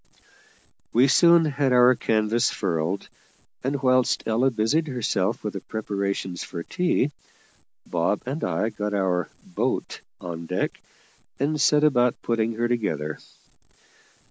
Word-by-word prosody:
We 125 +4 +5
soon 170 +3 +6
had 140 -2 0
our 125 +1 +6
canvas 110 0 +1
furled, 90 0 -2 0.6
and, 135 +1 -2
whilst 130 -1 +3
Ella 115 +4 +2
busied 125 +8 0
herself 115 -6 -1
with 105 - -3
the 100 - -4
preparations 100 -3 -3
for 85 - -6
tea, 175 - 0 0.7
Bob 85 +4 -1
and 135 +5 -4
I 90 +5 0
got 105 -1 -3
our 90 -4 0
"boat" - - -3 0.2
on 85 -1 -6
deck, 90 +2 -2 0.6
and 150 +2 0
set 150 +1 +4
about 125 -5 +3
putting 115 -1 0
her 120 +1 0
together. 80 -11 -2
115 Hz, 125 wpm, -24 LUFS, 95-130 Hz, 0.7 s, soon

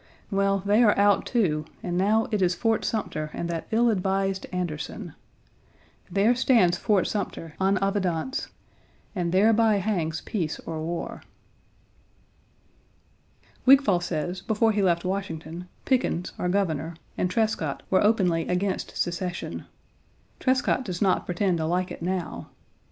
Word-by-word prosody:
Well, 195 -1 +1
they 205 +3 +4
are 215 -3 +5
out, 200 0 +3
too, 170 -11 +1 0.2
and 175 -1 -2
now 210 +5 +2
it 210 -2 0
is 180 -1 +2
Fort 225 0 +1
Sumter 155 -8 -2
and 170 - -3
that 165 -1 -4
ill 235 +1 +3
advised 195 -1 -1
Anderson. 175 -5 -4 1.0
There 200 +6 +3
stands 235 -8 +4
Fort 195 +1 +2
Sumter, 180 -6 -4
en 195 +1 +3
evidence, 195 - -1 0.7
and 175 -3 -1
thereby 215 +3 +4
hangs 180 -5 -1
peace 165 -7 -3
or 160 -1 -5
war. 170 +2 -4 2.5
Wigfall 270 -8 +6
1 - - -5
says 175 +1 -3
before 220 +2 +2
he 210 -1 0
left 175 -2 +2
Washington, 175 -3 -4 0.2
Pickens, 250 -9 0
our 180 - 0
Governor, 170 -4 -1 0.2
and 180 - 0
Trescott 180 -8 -1
were 190 - +4
openly 185 -6 +2
against 185 +2 -2
secession; 175 0 -3 0.7
Trescott 260 0 +1
does 180 -6 -5
not 190 -2 +1
pretend 180 -1 0
to 160 - -1
like 180 +2 0
it - - -8
now. 180 0 -3
190 Hz, 135 wpm, -26 LUFS, 175-210 Hz, 2.5 s, Wigfall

